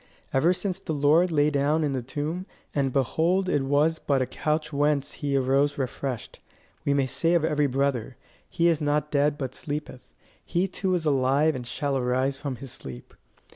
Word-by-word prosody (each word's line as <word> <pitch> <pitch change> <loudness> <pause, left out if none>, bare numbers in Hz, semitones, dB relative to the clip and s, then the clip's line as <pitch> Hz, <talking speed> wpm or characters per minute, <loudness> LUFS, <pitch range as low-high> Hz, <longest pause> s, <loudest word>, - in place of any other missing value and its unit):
Ever 145 +6 +4
since 185 0 -2
the 160 - -4
Lord 155 +5 +4
lay 150 -1 +3
down 145 +3 +2
in 145 -2 0
the 130 - -1
tomb, 150 - -4 0.3
and 135 -2 +1
behold 165 +8 +1
it 145 - +1
was 145 +4 +2
but 140 -2 +1
a 130 - +1
couch 155 +3 -2
whence 145 -1 +1
he 140 -2 -1
arose 135 +2 +2
refreshed, 130 -3 -4 0.4
we - - +1
may 140 -1 +2
say 165 +6 +1
of 165 -2 +3
every 150 -2 +2
brother: 130 -2 -1 0.3
He 170 - +2
is 165 -3 +2
not 150 0 0
dead 145 0 +2
but 130 -3 -4
sleepeth. 145 -3 -6 0.3
He 180 +3 0
too 185 0 -1
is 170 -2 -2
alive 140 +2 +3
and 125 -3 -6
shall 140 +1 -2
arise 130 +1 +1
from 140 -1 -4
his 135 0 -8
sleep. 65 - -9
145 Hz, 185 wpm, -26 LUFS, 135-155 Hz, 0.4 s, Ever